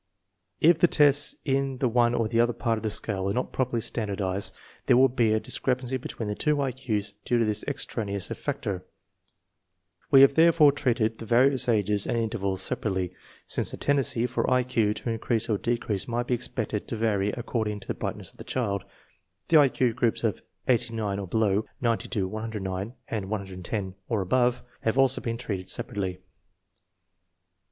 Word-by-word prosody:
H 165 +1 +6
the 175 - +6
tests 145 -2 +4
in 135 -1 0
the 130 - +1
one 120 0 +3
or 115 - +1
the 115 +1 0
other 120 +1 +3
part 115 -1 -1
of - - -13
the 110 - -1
scale 100 -2 -1
are 100 - -1
not 125 - -2
properly 125 -3 0
standardized, 100 -3 -2 0.4
there - - +6
will 130 +1 +7
be 120 -3 +2
a 110 - +3
dis - - -3
crepancy 130 0 -1
between 115 -3 -5
the 105 - -1
two 150 +7 0
I 135 -2 0
Q*s 110 -6 -2
due 120 - +1
to 115 - +2
this 105 0 -1
extraneous 105 -8 -3
factor. 95 -2 -3 1.3
We 135 -1 +8
have 135 0 +7
therefore 160 -1 +6
treated 120 -5 0
the 115 - -7
various 125 +2 +3
ages 105 -2 +2
and - - 0
intervals 100 -4 -1
separately. 95 -4 -2 0.3
Since - - 0
the - - -4
tendenqy 135 -4 +1
for 125 - -1
I 125 0 +3
Q 115 -4 +1
to 115 - -4
increase 115 0 0
or 105 -4 0
decrease 115 -4 -1
might 120 0 -1
be 125 - -1
expected 115 -3 -3
to - - -3
vary 105 -3 +1
ac 120 +3 -4
cording 110 -3 -2
to - - -13
the - - -1
brightness - - -5
of - - -20
the - - -9
child, 100 -7 -2 0.7
the 165 - +7
I 145 -2 +6
Q 125 -2 +1
groups 120 -1 0
of 110 -5 0 0.3
89 115 -5 0
or 100 - -5
below, 105 +1 +1
90 115 -2 0
to 100 -6 -1
109, 105 -1 -4
and 100 -4 -4
110 95 -1 -4 0.2
or 110 -4 +1
above, 120 +5 +1 0.2
have 110 +3 0
also 135 -1 +4
been 115 -1 -3
treated 95 -6 -4
separately. 100 -7 -2
115 Hz, 185 wpm, -27 LUFS, 105-125 Hz, 1.3 s, We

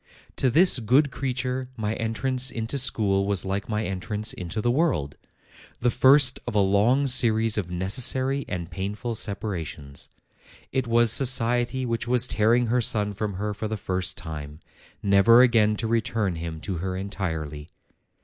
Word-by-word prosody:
To 130 - +2
this 165 +1 +4
good 130 +6 +2
creature 130 -1 -3
my 110 -1 -2
entrance 125 +4 +1
into 115 +3 -3
school 100 -6 +1
was 100 -3 0
like 100 +3 -3
my 105 0 -2
entrance 105 +3 -1
into 90 +4 -6
the 120 +3 +1
world, 130 - 0 0.6
the 120 0 +1
first 130 +2 +4
of - - -4
a - - +3
long 105 +8 +2
series 115 -4 +2
of 95 -5 -2
necessary 130 +9 +1
and 90 -2 -5
painful 100 +7 -4
separations; 90 - -4 0.6
it 130 -2 -1
was 115 -1 +3
society 125 0 +1
which 115 -1 -3
was 125 0 +3
tearing 115 +3 +2
her 120 +2 +1
son 105 -2 +2
from 100 -1 -4
her 105 +2 -3
for 110 +2 -5
the 110 0 -4
first 95 -2 -2
time, 75 -2 -8 0.4
never 100 +5 +5
again 110 -4 +3
to 115 - -3
return 110 -5 -1
him 80 -1 -6
to 95 -4 -4
her 95 +2 -4
entirely. 80 -7 -5
110 Hz, 160 wpm, -24 LUFS, 95-125 Hz, 0.6 s, never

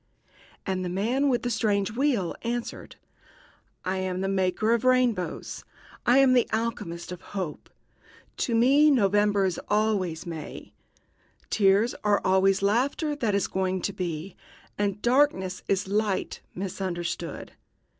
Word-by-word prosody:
And 185 -2 -2
the 180 - -3
man 235 +10 +1
with 245 -2 0
the 245 - -1
strange 200 -3 +1
wheel 235 - 0
answered: 240 0 -4 0.9
"I 185 +1 -1
am 185 0 -2
the 195 - -1
maker 195 +3 +1
of 235 - 0
rainbows. 255 -7 +1 0.4
I 245 +2 +6
am 270 -1 +6
the 245 -2 +3
alchemist 205 -7 -3
of 180 - -7
hope. 185 -7 -6 0.7
To 235 - 0
me 275 +6 +5
November 205 -5 +3
is 185 -2 -1
always 205 -6 0
May, 165 -3 -8 0.8
tears 205 +3 +3
are 205 -1 +3
always 190 +1 +3
laughter 275 +8 +1
that 220 -7 0
is 200 - +1
going 190 -1 -2
to 200 - -1
be, 175 -1 -4 0.4
and 205 0 -1
darkness 240 -8 +2
is 195 0 0
light 205 0 -1
misunderstood. 180 -3 -4
200 Hz, 135 wpm, -26 LUFS, 185-235 Hz, 0.9 s, I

